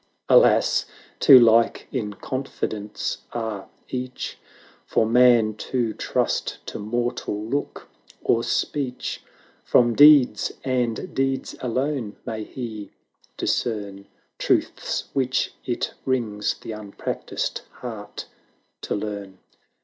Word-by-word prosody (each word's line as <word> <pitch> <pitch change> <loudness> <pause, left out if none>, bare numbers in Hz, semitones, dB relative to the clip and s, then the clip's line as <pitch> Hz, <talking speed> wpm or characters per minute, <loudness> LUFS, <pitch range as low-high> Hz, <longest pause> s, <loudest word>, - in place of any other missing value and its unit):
Alas! - - +5 0.3
too 135 - +9
like 115 -1 +4
in 105 -6 -2
confidence 110 -5 -4
are 110 -4 -4 0.2
each, 130 0 -5 0.4
For - - +1
man 120 -2 +5 0.2
to 120 -4 0
trust - - -1
to - - -6
mortal 120 -1 -2
look 140 +5 -3 0.4
or 115 0 +2
speech; 130 -2 -2 0.4
From 120 -1 +4
deeds, 145 -1 +6
and 130 +6 -1
deeds 135 -1 -1
alone, 130 -2 -2
may 110 -1 -4
he 110 -3 -7 0.5
discern 100 -4 -2 0.3
Truths - - 0
which 130 -1 0
it 120 - -2
wrings 115 -6 -1
the - - -7
unpractised 105 -2 -4
heart 110 -4 -8 0.6
to - - -2
learn. 100 -2 -5
120 Hz, 100 wpm, -24 LUFS, 105-130 Hz, 0.6 s, too